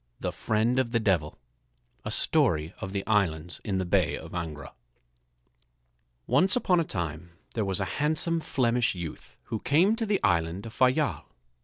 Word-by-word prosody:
THE - - -2
FRIEND 115 +4 +1
OF 120 -3 -1
THE 115 - +3
DEVIL 90 -8 0 0.7
A - - -4
Story 80 +2 +2
of 95 - -4
the 100 0 -3
Islands 90 -6 0
in 100 -3 -1
the 95 - -1
Bay 85 - +1
of - - -10
Angra 80 -4 -5 1.5
Once 180 - +4
upon 185 -8 +2
a - - +2
time 85 - -5 0.2
there 110 - 0
was 95 -1 -1
a 95 - 0 0.2
handsome 160 +2 +1
Flemish 125 -7 +1
youth 85 -3 -8 0.2
who 110 - -1
came 175 - +3
to 225 -2 -2
the 205 -1 +1
island 90 +1 +1
of 115 - -8
Fayal. 135 +3 +1
105 Hz, 165 wpm, -27 LUFS, 85-140 Hz, 1.5 s, Once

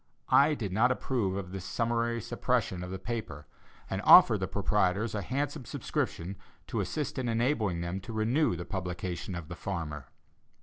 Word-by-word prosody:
I 150 +2 +6
did 100 -8 -4
not 120 +5 +4
approve 115 -7 -1
of 90 -2 -5
this 95 -2 -5
summary 115 +2 0
suppression 90 -2 -1
of 90 - -6
the 95 - -4
paper, 95 -8 -5 0.4
and - - -3
offered - - +8
the - - -1
proprietors 100 +5 +1
a 105 - -1
handsome 140 - -3
subscription 95 -2 -3 0.3
to - - -3
assist 150 -2 -2
in 125 -2 -1
enabling 115 - +1
them 85 +2 -3
to 95 +4 -9
renew 115 - +2
the 85 0 -6
publication 90 -1 -4
of 85 -3 -6
the 85 - -7
Farmer. 80 -6 -5
100 Hz, 170 wpm, -30 LUFS, 90-120 Hz, 0.4 s, offered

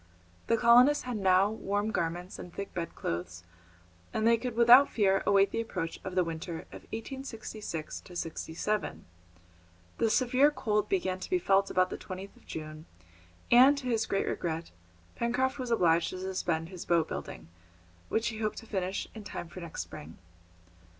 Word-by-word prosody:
The 230 - +3
colonists 245 +5 +6
had 250 -3 -3
now 190 +1 +4
warm 205 0 -2
garments 175 0 -3
and 175 - -8
thick 200 +3 -6
bedclothes, 90 - -4 0.7
and 220 - -1
they 230 0 +6
could 240 0 -4
without 240 +4 +8
fear 195 -3 +2
await 200 0 +4
the 230 - -1
approach 180 -7 -4
of 185 -1 -6
the 185 - +4
winter 165 0 -5
of - - -9
1866 220 - -6
67. 175 +4 -3 0.9
The 225 - +3
severe 255 +5 +4
cold 210 -7 -1
began 185 -1 0
to - - -7
be 365 - +3
felt 195 - +2
about 185 0 +2
the - - -5
20th 190 +1 -8
of - - -22
June, 155 0 -7 0.6
and, 260 +4 +7
to 255 -3 -4
his 225 -2 +1
great 195 - 0
regret, 165 -1 -3 0.5
Pencroft 260 +4 0
was 250 -1 -3
obliged 170 -7 +3
to 185 - -6
suspend 175 -3 -2
his 180 -2 -7
boat 165 -2 +2
building, 80 - -7 0.6
which 225 +1 +1
he 220 -2 -7
hoped 215 -1 -2
to - - -8
finish 190 -3 -2
in 220 - -9
time 175 - -6
for 185 - -9
next 170 -2 -5
spring. 80 +2 -11
195 Hz, 165 wpm, -30 LUFS, 175-230 Hz, 0.9 s, without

